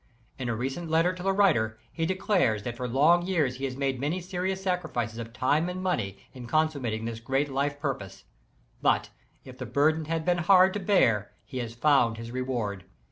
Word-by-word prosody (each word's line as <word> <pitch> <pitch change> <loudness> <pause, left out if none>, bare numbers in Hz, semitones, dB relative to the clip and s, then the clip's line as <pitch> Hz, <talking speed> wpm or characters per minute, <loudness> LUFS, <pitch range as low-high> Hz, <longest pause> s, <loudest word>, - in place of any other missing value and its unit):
In 125 -2 -3
a 115 - 0
recent 135 +8 -4
letter 165 +3 +3
to 185 - -9
the 195 +1 +1
writer, 120 - +2 0.2
he 165 -1 -1
declares 185 - +1
that 120 +1 -4
for 125 +1 -4
long 150 +8 +4
years 150 -9 +1
he 135 - -3
has 130 -1 -4
made 135 -2 -1
many 150 +7 -1
serious 185 +1 -3
sacrifices 160 - -2
of 115 0 -6
time 145 +8 +1
and 185 +1 -5
money, 115 - -1 0.2
in 125 -2 -9
consummating 135 -7 0
this 115 -1 -4
great 135 +5 0
life 140 +2 -1
purpose. 130 -10 -4 0.6
But, - - +2 0.3
if 130 0 -12
the 125 - -5
burden 155 +6 +2
has 165 +1 -2
been 175 +1 +1
hard 185 +2 +5
to 210 - -2
bear, 115 - +2
he 130 - -6
has 115 -1 -5
found 120 -4 +3
his 115 +1 -7
reward. 120 -7 -3
140 Hz, 195 wpm, -27 LUFS, 120-175 Hz, 0.6 s, hard